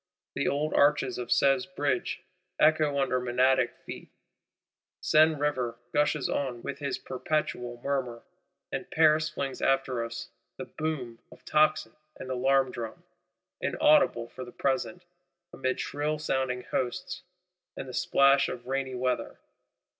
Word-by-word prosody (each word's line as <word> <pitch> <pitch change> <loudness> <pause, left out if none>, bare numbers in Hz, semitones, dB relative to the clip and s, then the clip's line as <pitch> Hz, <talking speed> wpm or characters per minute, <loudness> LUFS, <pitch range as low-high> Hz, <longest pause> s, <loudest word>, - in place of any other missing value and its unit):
The - - -1
old 150 +2 0
arches 140 -3 +3
of 120 - -4
Sèvres 135 -2 +3
Bridge 140 -4 -1 0.4
echo 155 -2 +4
under 130 -2 +1
Menadic 125 0 +2
feet; - - -8 0.9
Seine 155 +1 +4
River 130 -5 -1 0.2
gushes 150 -1 +2
on 125 -4 -2
with - - -5
his 140 -2 -2
perpetual 125 -3 -3
murmur; 130 -4 -2 0.5
and - - -4
Paris 155 -1 +4
flings 135 -3 -4
after 135 -3 +1
us 115 0 -6 0.3
the - - -5
boom 135 -7 -4
of - - -17
tocsin 155 -7 +2 0.3
and 130 - -6
alarm 130 +1 +2
drum,—inaudible, 115 +2 0
for 130 - -8
the 120 - -10
present, 140 +8 -1 0.5
amid 130 -1 -2
shrill 150 +1 -2
sounding 130 -4 -1
hosts, 180 +8 -3 0.6
and 135 - -5
the 130 - -8
splash 140 +2 +4
of 120 0 -7
rainy 135 0 -2
weather. 125 0 -2
135 Hz, 130 wpm, -28 LUFS, 125-150 Hz, 0.9 s, echo